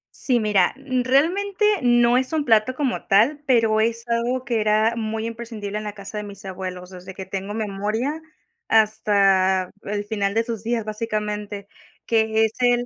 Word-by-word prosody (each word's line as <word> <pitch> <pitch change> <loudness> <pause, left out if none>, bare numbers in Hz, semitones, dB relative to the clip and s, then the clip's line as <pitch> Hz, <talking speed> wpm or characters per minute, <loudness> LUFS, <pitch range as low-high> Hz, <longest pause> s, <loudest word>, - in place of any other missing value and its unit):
Sí, 250 -3 +2
mira, 205 -4 +2
realmente, 280 - +1 0.2
no 240 0 +4
es 260 +4 -3
un 300 -2 0
plato 225 +3 +3
como 270 -3 -2
tal, 230 +9 +3
pero 225 -3 +3
es 230 +1 -1
algo 240 +2 -1
que 235 -3 0
era 215 +2 +2
muy 220 0 -3
imprescindible 225 -3 -5
en - - -7
la 210 - -4
casa 200 +1 -8
de - - -5
mis 200 -1 -10
abuelos, 185 -1 -6
desde 185 +1 -10
que 190 - -7
tengo 195 +2 -5
memoria 220 +8 -2 0.5
hasta 195 -4 +3
el 205 0 -4
final 205 -1 -2
de 225 - +3
sus 230 -3 -5
días, 230 -1 -1
básicamente 210 -2 -4 0.4
que 220 -1 +2
es 220 - -3
el 245 -1 +2
220 Hz, 170 wpm, -22 LUFS, 205-240 Hz, 0.5 s, no